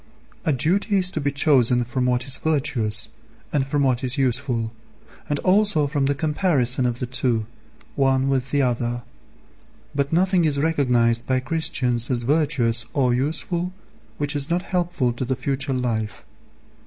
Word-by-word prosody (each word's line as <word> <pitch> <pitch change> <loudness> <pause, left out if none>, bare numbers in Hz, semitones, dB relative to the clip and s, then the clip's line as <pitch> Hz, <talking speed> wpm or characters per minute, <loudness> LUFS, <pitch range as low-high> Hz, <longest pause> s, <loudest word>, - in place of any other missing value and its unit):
A 160 - +2
duty 195 - +1
is 185 -1 +1
to 155 - -3
be 140 0 -1
chosen 130 -4 +3
from 125 +2 -2
what 125 0 0
is 135 -1 0
virtuous, 135 -8 +2 0.4
and 135 -2 0
from 145 +1 0
what 130 -1 0
is 130 +2 0
useful, 125 -3 0 0.6
and 145 - 0
also 195 -4 +3
from 140 -1 -1
the 140 - 0
comparison 145 -5 +1
of 120 -1 -3
the 125 - -3
two, 120 -2 -1 0.5
one 135 -1 +1
with 135 -1 -1
the 145 -1 +1
other; 120 -1 -2 0.9
but 140 0 -1
nothing 180 +1 +2
is 150 -3 +2
recognized 125 -7 +1
by 130 -1 +1
Christians 125 -5 +3
as 120 -2 0
virtuous 125 -5 +1
or 125 -3 +2
useful 170 +7 -2 0.4
which 145 0 -1
is 145 +1 +1
not 175 +2 0
helpful 175 -10 -1
to 120 - -4
the 130 +1 -2
future 135 +2 -3
life. 115 -4 -3
135 Hz, 160 wpm, -22 LUFS, 125-155 Hz, 0.9 s, chosen